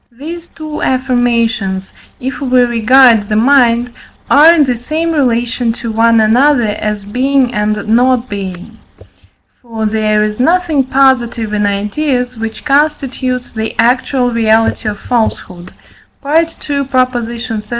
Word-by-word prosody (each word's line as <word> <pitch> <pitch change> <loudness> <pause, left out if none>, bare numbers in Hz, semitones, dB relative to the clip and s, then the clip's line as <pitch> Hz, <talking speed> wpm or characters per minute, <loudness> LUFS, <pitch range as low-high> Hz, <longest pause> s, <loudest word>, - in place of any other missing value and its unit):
These 335 +5 -8
two 310 -1 -8
affirmations, 240 -6 -1 0.3
if 265 +3 -5
we 255 -2 +2
regard 240 -2 +4
the 210 - 0
mind, 240 0 +2 0.4
are 300 +4 +7
in 330 -3 +4
the 255 -3 -1
same 310 +8 -3
relation 240 -4 0
to 230 0 -6
one 230 +1 +3
another 240 +2 +3
as 210 -1 -3
being 255 +3 0
and 210 -1 -2
not 245 +2 +2
being; 190 -4 -7 0.8
for 225 -3 -5
there 215 0 +1
is 210 +1 -3
nothing 320 -1 +1
positive 250 -5 +1
in 210 -1 0
ideas, 245 +5 -2
which 220 +1 -7
constitutes 275 -4 -1
the 220 -1 -5
actual 250 +1 +1
reality 225 -1 +1
of 205 -1 -6
falsehood 185 -6 -3 0.5
(II. 285 - -4
xxxv. 255 -8 -1
245 Hz, 125 wpm, -13 LUFS, 220-270 Hz, 0.8 s, are